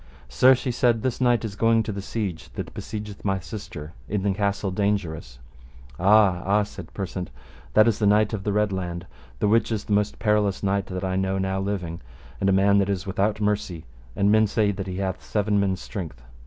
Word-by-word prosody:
Sir, 130 Hz, -, +6 dB
she 125 Hz, 0 st, -3 dB
said, 120 Hz, -2 st, +2 dB
this 130 Hz, -1 st, -1 dB
knight 120 Hz, -2 st, +3 dB
is 100 Hz, -2 st, -5 dB
going 115 Hz, +1 st, +3 dB
to 110 Hz, -, -4 dB
the 100 Hz, -1 st, -4 dB
siege 95 Hz, -5 st, -4 dB
that -, -, -6 dB
besiegeth 105 Hz, -1 st, -7 dB
my 95 Hz, -1 st, +1 dB
sister 85 Hz, -4 st, -8 dB, 0.2 s
in 100 Hz, -1 st, -1 dB
the 100 Hz, -1 st, +1 dB
Castle 100 Hz, 0 st, -1 dB
Dangerous. 90 Hz, -, -2 dB, 0.6 s
Ah, 100 Hz, -1 st, +5 dB
ah, 105 Hz, +2 st, +2 dB
said 100 Hz, -4 st, -10 dB
Persant, 95 Hz, -2 st, -5 dB, 0.5 s
that 110 Hz, +1 st, +7 dB
is 110 Hz, -3 st, +1 dB
the 105 Hz, -, +3 dB
Knight 105 Hz, +2 st, +3 dB
of 100 Hz, -3 st, -3 dB
the 105 Hz, -, 0 dB
Red 105 Hz, 0 st, +1 dB
Laund, 90 Hz, -2 st, -4 dB, 0.3 s
the 105 Hz, -, +1 dB
which 115 Hz, +2 st, +3 dB
is 105 Hz, -2 st, -1 dB
the 105 Hz, -, -2 dB
most 105 Hz, 0 st, +1 dB
perilous 105 Hz, -2 st, +1 dB
knight 100 Hz, 0 st, 0 dB
that 95 Hz, 0 st, -5 dB
I 95 Hz, 0 st, -1 dB
know 95 Hz, 0 st, 0 dB
now 95 Hz, 0 st, -1 dB
living, 95 Hz, -4 st, -3 dB, 0.4 s
and 100 Hz, -, +2 dB
a -, -, +4 dB
man 100 Hz, +1 st, +4 dB
that 100 Hz, 0 st, +1 dB
is 95 Hz, -1 st, -2 dB
without 100 Hz, +2 st, 0 dB
mercy, 105 Hz, -6 st, -1 dB, 0.3 s
and 100 Hz, +1 st, +3 dB
men 110 Hz, 0 st, +5 dB
say 105 Hz, 0 st, +1 dB
that 95 Hz, -1 st, -5 dB
he 90 Hz, -1 st, -4 dB
hath 95 Hz, -1 st, -3 dB
seven 105 Hz, -1 st, 0 dB
men's 95 Hz, -2 st, 0 dB
strength. 85 Hz, -, -6 dB
100 Hz, 210 wpm, -24 LUFS, 95-105 Hz, 0.6 s, that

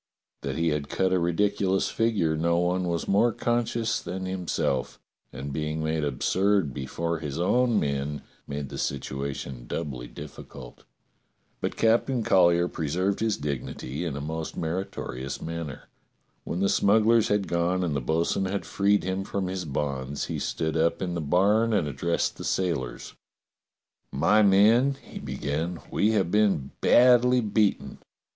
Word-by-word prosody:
That -, -, -3 dB
he 85 Hz, 0 st, +2 dB
had 75 Hz, -2 st, -2 dB
cut 95 Hz, -1 st, +1 dB
a 90 Hz, -, +3 dB
ridiculous 95 Hz, +2 st, +1 dB
figure 105 Hz, -9 st, +1 dB
no 85 Hz, +2 st, +1 dB
one 90 Hz, +1 st, +1 dB
was 85 Hz, -1 st, -2 dB
more 105 Hz, +5 st, +3 dB
conscious 120 Hz, 0 st, 0 dB
than 95 Hz, 0 st, -5 dB
himself, 90 Hz, -8 st, -2 dB, 0.3 s
and 70 Hz, +2 st, -6 dB
being 75 Hz, +1 st, -2 dB
made 80 Hz, 0 st, -1 dB
absurd 90 Hz, +4 st, +1 dB
before 85 Hz, +6 st, -3 dB
his 75 Hz, -3 st, -5 dB
own 120 Hz, +5 st, +3 dB
men 70 Hz, 0 st, -2 dB, 0.2 s
made 70 Hz, -1 st, -4 dB
the -, -, -6 dB
situation 70 Hz, -2 st, -4 dB
doubly 65 Hz, -5 st, -4 dB
difficult. -, -, -11 dB, 0.7 s
But -, -, -3 dB
Captain 115 Hz, +2 st, +2 dB
Collyer 85 Hz, -3 st, +4 dB
preserved 90 Hz, +6 st, -1 dB
his 110 Hz, -2 st, 0 dB
dignity 70 Hz, +1 st, -4 dB
in 80 Hz, -5 st, -3 dB
a -, -, -4 dB
most 80 Hz, +2 st, -5 dB
meritorious 80 Hz, -6 st, -4 dB
manner. 80 Hz, -4 st, -6 dB, 0.6 s
When 90 Hz, -, -3 dB
the 100 Hz, -, +3 dB
smugglers 110 Hz, +2 st, +4 dB
had 105 Hz, -1 st, 0 dB
gone 85 Hz, +2 st, 0 dB
and 80 Hz, -5 st, -1 dB
the 70 Hz, -, -1 dB
bo'sun 80 Hz, +7 st, 0 dB
had 95 Hz, +1 st, -2 dB
freed 100 Hz, +1 st, +2 dB
him 95 Hz, +1 st, -2 dB
from 100 Hz, 0 st, -3 dB
his 90 Hz, -1 st, -3 dB
bonds, 70 Hz, -1 st, -3 dB
he -, -, -4 dB
stood 80 Hz, 0 st, -2 dB
up 85 Hz, +2 st, +1 dB
in 90 Hz, -1 st, -2 dB
the 85 Hz, -, -2 dB
barn 105 Hz, +9 st, +3 dB
and 95 Hz, -8 st, +1 dB
addressed 85 Hz, +5 st, -1 dB
the -, -, -7 dB
sailors: 75 Hz, -10 st, -2 dB, 1.0 s
"My 85 Hz, +10 st, +3 dB
men," 110 Hz, +7 st, +5 dB
he -, -, -9 dB
began, 80 Hz, +4 st, -3 dB
"we 110 Hz, +2 st, +2 dB
have 95 Hz, -5 st, +1 dB
been 100 Hz, -10 st, +2 dB
badly 125 Hz, 0 st, +5 dB
beaten. 105 Hz, -1 st, 0 dB
85 Hz, 150 wpm, -26 LUFS, 75-100 Hz, 1.0 s, men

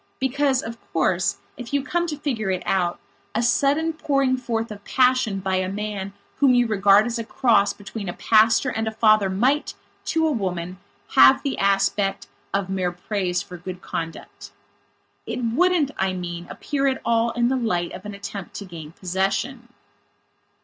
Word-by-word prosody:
Because, 265 Hz, 0 st, +1 dB
of 230 Hz, +1 st, -7 dB
course, 170 Hz, +3 st, +1 dB, 0.2 s
if 245 Hz, +1 st, -8 dB
you 280 Hz, -, +1 dB
come 345 Hz, +4 st, -1 dB
to 300 Hz, -3 st, -4 dB
figure 240 Hz, -9 st, -2 dB
it 185 Hz, -1 st, -1 dB
out, 180 Hz, -2 st, 0 dB, 0.4 s
a 230 Hz, -, +1 dB
sudden 285 Hz, +6 st, +2 dB
pouring 275 Hz, -4 st, +1 dB
forth 230 Hz, -3 st, -3 dB
of 205 Hz, -1 st, -9 dB
passion 250 Hz, -6 st, +2 dB
by 190 Hz, 0 st, 0 dB
a 185 Hz, 0 st, -1 dB
man 200 Hz, -1 st, -4 dB, 0.2 s
whom 265 Hz, -3 st, +4 dB
you 245 Hz, 0 st, +4 dB
regard 205 Hz, -1 st, +4 dB
as 240 Hz, 0 st, -2 dB
a -, -, -2 dB
cross 220 Hz, -3 st, +2 dB
between 205 Hz, -1 st, -7 dB
a -, -, -4 dB
pastor 225 Hz, +3 st, +3 dB
and 225 Hz, -1 st, -2 dB
a -, -, -1 dB
father 215 Hz, -2 st, +4 dB
might, 255 Hz, +10 st, +1 dB, 0.3 s
to 320 Hz, 0 st, +1 dB
a 315 Hz, -, +2 dB
woman, 185 Hz, -, -3 dB, 0.3 s
have 130 Hz, 0 st, +6 dB
the 275 Hz, -, -1 dB
aspect 195 Hz, 0 st, +1 dB, 0.3 s
of 195 Hz, -1 st, -1 dB
mere 185 Hz, -2 st, -1 dB
praise 180 Hz, 0 st, -2 dB
for 180 Hz, -, -10 dB
good 180 Hz, +1 st, -8 dB
conduct. 165 Hz, -1 st, -6 dB, 0.8 s
It 250 Hz, -, -3 dB
wouldn't, 300 Hz, +5 st, +2 dB
I 190 Hz, 0 st, +1 dB
mean, 175 Hz, -1 st, -5 dB
appear 275 Hz, -1 st, -2 dB
at 265 Hz, -1 st, 0 dB
all 230 Hz, 0 st, +2 dB
in 240 Hz, 0 st, +1 dB
the 265 Hz, -, +1 dB
light 180 Hz, -9 st, -1 dB
of 185 Hz, -, -9 dB
an 210 Hz, -1 st, -7 dB
attempt 200 Hz, -2 st, -7 dB
to 200 Hz, -, -6 dB
gain 165 Hz, -4 st, -10 dB
possession. 195 Hz, +8 st, -2 dB
215 Hz, 175 wpm, -23 LUFS, 190-255 Hz, 0.8 s, have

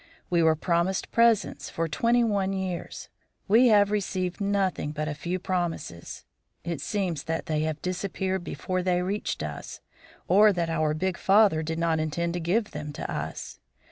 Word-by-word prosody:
We 170 Hz, -1 st, +3 dB
were 160 Hz, -1 st, +4 dB
promised 170 Hz, +3 st, 0 dB
presents 230 Hz, -2 st, +2 dB
for 165 Hz, 0 st, -2 dB
twenty 235 Hz, +10 st, +2 dB
one 200 Hz, -4 st, 0 dB
years; 190 Hz, -2 st, -4 dB, 0.4 s
we 230 Hz, +5 st, +6 dB
have 205 Hz, -2 st, +5 dB
received 190 Hz, -2 st, -2 dB
nothing 195 Hz, -6 st, 0 dB
but 155 Hz, 0 st, -3 dB
a 150 Hz, -, -2 dB
few 170 Hz, +5 st, -3 dB
promises. 175 Hz, -, -4 dB, 0.4 s
It 170 Hz, -4 st, -4 dB
seems 185 Hz, -3 st, -2 dB
that 165 Hz, 0 st, -2 dB
they 155 Hz, -1 st, -1 dB
have 155 Hz, 0 st, -2 dB
disappeared 190 Hz, 0 st, -2 dB
before 185 Hz, +1 st, -3 dB
they 180 Hz, 0 st, +1 dB
reached 200 Hz, +3 st, -2 dB
us, -, -, -6 dB, 0.5 s
or 205 Hz, +4 st, +6 dB
that 170 Hz, -2 st, -1 dB
our 155 Hz, -2 st, +1 dB
big 185 Hz, +2 st, -1 dB
father 195 Hz, -5 st, +4 dB
did 160 Hz, +1 st, -3 dB
not 165 Hz, -1 st, +1 dB
intend 170 Hz, +2 st, -1 dB
to 175 Hz, -, -2 dB
give 205 Hz, +7 st, 0 dB
them 150 Hz, 0 st, -6 dB
to -, -, -5 dB
us. 80 Hz, +1 st, -5 dB
180 Hz, 170 wpm, -27 LUFS, 160-195 Hz, 0.5 s, we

